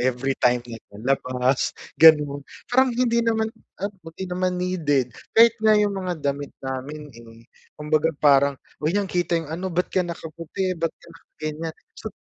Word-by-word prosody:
every 130 +2 0
time 125 -1 +3
like 115 -2 -9
lalabas 130 +3 0 0.2
ganon. 150 -3 +6 0.3
Parang 260 +1 +5
hindi 235 -2 +2
naman 225 -1 0 0.2
ano, 200 +2 -4 0.2
hindi 190 - -4
naman 185 0 -1
needed, 150 -9 0 0.2
kahit 230 0 +8
nga 215 -1 +5
yung 210 -1 +2
mga 175 -5 -4
damit 140 0 -1 0.2
namin 135 +3 -5
eh, 115 0 -15 0.3
kumbaga 150 +1 +1
parang, 140 -1 +4 0.2
"Huy, 155 +6 0
nakikita 180 -4 0
yung 160 -2 -4
ano, 185 +3 -3
ba't 180 +1 0
ka 185 - +2
nakaputi, 170 +2 -4
ba't 165 - +2
ka - - -22
naka-ganyan" 155 +1 -7 0.3
So, - - -5
155 Hz, 155 wpm, -23 LUFS, 135-185 Hz, 0.3 s, kahit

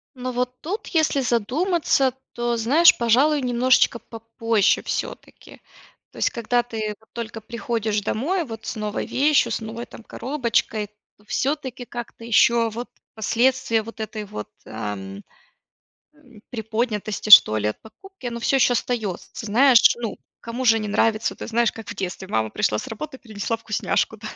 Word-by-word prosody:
Ну, 255 0 -4
вот 250 +1 -3
тут, 390 +8 -4
если 315 -4 +1
задуматься, 265 - +1 0.2
то 240 0 -1
знаешь, 290 +10 +5
пожалуй, 270 +6 +3
немножечко 250 -1 +3
попозже 225 -2 0
всё-таки, - - -6 0.5
то - - -17
есть - - +2
когда 240 +1 0
ты 220 -3 -4
вот 220 - -27
только 225 -2 -6
приходишь 220 -2 -2
домой 330 - -1
вот 225 -5 -9
с - - -4
новой 210 -1 -3
вещью, 290 +2 +2
с - - -2
новой 225 +2 -6
там 230 - -13
коробочкой, 235 -6 -1 0.3
то 210 - -25
всё-таки 265 -3 -2
как-то 240 -1 -8
ещё 235 0 +4
вот 235 +3 -6 0.3
последствия 235 +1 +1
вот 230 +1 -11
этой 215 0 -5
вот, 105 - -7 0.2
ам, 100 -2 -6 0.9
м, 255 -8 -19
приподнятости, 220 -2 -3
что 110 - +9
ли, 105 - 0
от 105 - -7
покупки, 385 - -11
оно 235 0 -4
всё 270 - +1
ещё 250 - +4
остаётся. 220 -6 -2 0.2
Знаешь, 245 +3 +5
ну, 225 - -4 0.2
кому 240 +2 -4
же 225 -1 +5
не 215 - -4
нравится? 215 +2 +1
Ты - - -7
знаешь, 235 0 +2
как 225 -1 -10
в 205 - -8
детстве: 190 0 -5
"Мама 110 - 0
пришла 105 - 0
с - - -8
работы 265 +5 -7
принесла 220 0 -3
вкусняшку". 220 0 -1
Да, 215 0 -8
230 Hz, 160 wpm, -23 LUFS, 215-255 Hz, 0.9 s, что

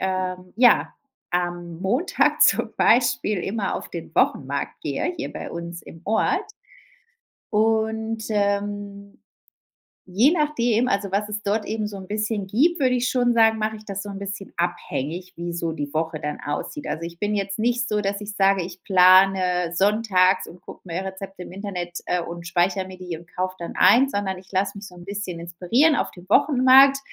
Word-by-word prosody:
ähm, 185 -1 -3
ja, 245 0 +4 0.4
am 175 -1 -3
Montag 250 - +1
zum - - +4
Beispiel 210 -2 +3
immer 195 +2 -2
auf - - -7
den - - -8
Wochenmarkt - - 0
gehe, 355 - -2
hier 305 - -5
bei - - -7
uns 170 0 -7
im 165 - -13
Ort. 390 - 0 1.0
Und, 220 0 0
ähm, 200 -1 -2 0.9
je 210 - +4
nachdem, 250 -8 +1
also, 200 -3 -1
was 205 +2 -1
es 210 0 -4
dort 210 +2 0
eben 215 -1 -2
so 205 -1 -7
'n 190 -1 -10
bisschen 210 -1 -2
gibt, 290 - +2
würde 255 -2 +3
ich 250 0 0
schon 245 -2 +2
sagen, 225 -1 +4
mache 220 0 -2
ich 215 - -15
das 195 -1 -5
so 205 - -8
'n 195 0 -6
bisschen 200 0 -7
abhängig, 175 +1 -3
wie 170 0 -4
so 170 -1 -2
die 145 -3 -5
Woche 160 0 -2
dann 150 0 -4
aussieht. 150 - -4
Also, 165 - -4
ich 170 0 -7
bin 205 0 -1
jetzt 195 0 -2
nicht 240 +2 0
so, 210 0 0
dass 200 0 -2
ich 210 0 -6
sage, 195 -2 +3
ich 180 +1 -10
plane 185 -2 +4
sonntags 195 -1 +3
und 175 - -13
gucke - - -12
mir 175 +1 -4
Rezepte 190 -1 -7
im - - -11
Internet, 180 -3 -5
äh, 180 0 0
und 170 0 -7
speichere 180 +2 +1
mir 185 0 -10
die 180 -3 -6
und 170 +1 -18
kaufe 185 0 -2
dann 170 - -6
ein, 270 +3 +6
sondern 200 -5 -2
ich 185 +1 -15
lasse 195 +1 -1
mich 200 0 -9
so 180 - -14
'n 175 0 -12
bisschen 195 -3 -5
inspirieren 180 - +2
auf - - -1
dem 180 0 -15
Wochenmarkt 270 +1 +6
195 Hz, 185 wpm, -23 LUFS, 180-220 Hz, 1.0 s, ein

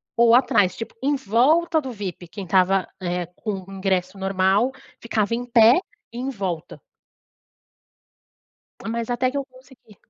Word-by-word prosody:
ou 235 0 +5
atrás, 205 -7 +3
tipo, 225 - -7
em 285 +2 +2
volta 295 - +2
do 265 -3 -6
VIP, 190 -5 -7
quem 195 +3 -8
estava, 185 +1 +2
eh, 180 -1 -2
com 200 -4 -4
o - - -11
ingresso 190 -1 -1
normal 195 +5 +1 0.3
ficava 225 -1 -1
em 240 - -3
pé, 235 +2 +6 0.3
em 245 +3 -4
volta. 190 - -5 2.1
Mas 230 -1 -3
até 250 +1 +1
que 275 - -6
eu 280 - -1
consegui 255 -4 -20
220 Hz, 145 wpm, -23 LUFS, 190-255 Hz, 2.1 s, pé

